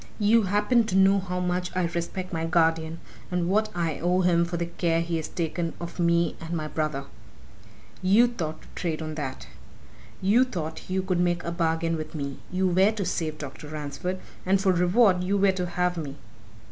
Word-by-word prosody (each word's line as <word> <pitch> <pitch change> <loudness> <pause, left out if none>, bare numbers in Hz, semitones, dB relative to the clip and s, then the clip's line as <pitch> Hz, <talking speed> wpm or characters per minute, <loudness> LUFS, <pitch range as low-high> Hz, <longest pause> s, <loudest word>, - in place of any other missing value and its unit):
You 220 +2 +4
happen 210 +5 +3
to 200 -4 -2
know 195 +1 +5
how 180 -1 -3
much 180 0 -1
I 185 - +1
respect 175 +2 -4
my 165 -1 -1
guardian 165 -1 +2 0.3
and 180 -1 0
what 215 +3 +2
I 165 -3 -1
owe 180 +2 +2
him 170 -1 +3
for 170 0 -3
the 170 - -1
care 170 -1 0
he 165 0 -1
has 160 - -3
taken 170 0 -2
of 170 +1 -7
me 170 0 +2
and 165 +1 -5
my 155 -2 -2
brother. 150 -3 -2 1.0
You 200 +6 +5
thought 165 -10 -4
to - - -17
trade 160 -3 -3
on 155 0 -4
that! 145 -4 -5 0.7
You 210 +7 +4
thought 165 -11 -5
you 190 0 0
could 185 -2 0
make 175 0 +1
a 170 - -3
bargain 165 -1 0
with 155 +1 -6
me; 140 -2 -4
you 185 +1 +1
were 190 +3 +4
to 205 -3 -3
save 160 -3 -2
Dr. 145 0 -8
Ransford, 150 +4 -4 0.3
and 190 +1 +3
for 190 0 +3
reward 180 +1 +4
you 195 +2 +1
were 195 0 +4
to 180 -1 -2
have 180 0 0
me! 145 -4 -5
175 Hz, 195 wpm, -26 LUFS, 165-185 Hz, 1.0 s, know